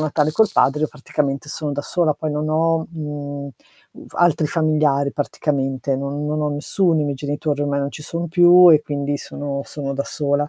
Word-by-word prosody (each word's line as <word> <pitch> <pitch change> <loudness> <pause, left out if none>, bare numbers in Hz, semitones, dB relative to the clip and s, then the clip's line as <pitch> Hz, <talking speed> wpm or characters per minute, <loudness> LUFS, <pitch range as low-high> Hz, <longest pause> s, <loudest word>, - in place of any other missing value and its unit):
il 155 - 0
Natale 150 0 +1
col 220 +3 +3
padre 135 +4 +2
io 155 - +1
praticamente 140 0 -3
sono 150 -1 -3
da 145 0 -3
sola 160 -3 +1
poi 155 - -4
non 150 +1 -2
ho, 165 +1 +1
mhmm, 145 -3 -6 0.4
uv - - -14
altri 165 -3 +3
familiari 150 -3 +1
praticamente, 135 -2 -2
non 140 +2 -4
non 150 +1 -1
ho 150 - 0
nessuno, 160 +3 +1
i - - +1
miei 140 -2 -2
genitori 145 +1 -2
ormai 140 -1 0
non 140 0 -2
ci 150 - -9
sono 170 +1 -4
più 175 +1 +7
e 150 -1 +5
quindi 145 -1 -2
sono 140 -1 -5
sono 140 -2 -5
da 140 +1 -2
sola. 145 0 -1
150 Hz, 200 wpm, -20 LUFS, 140-155 Hz, 0.4 s, più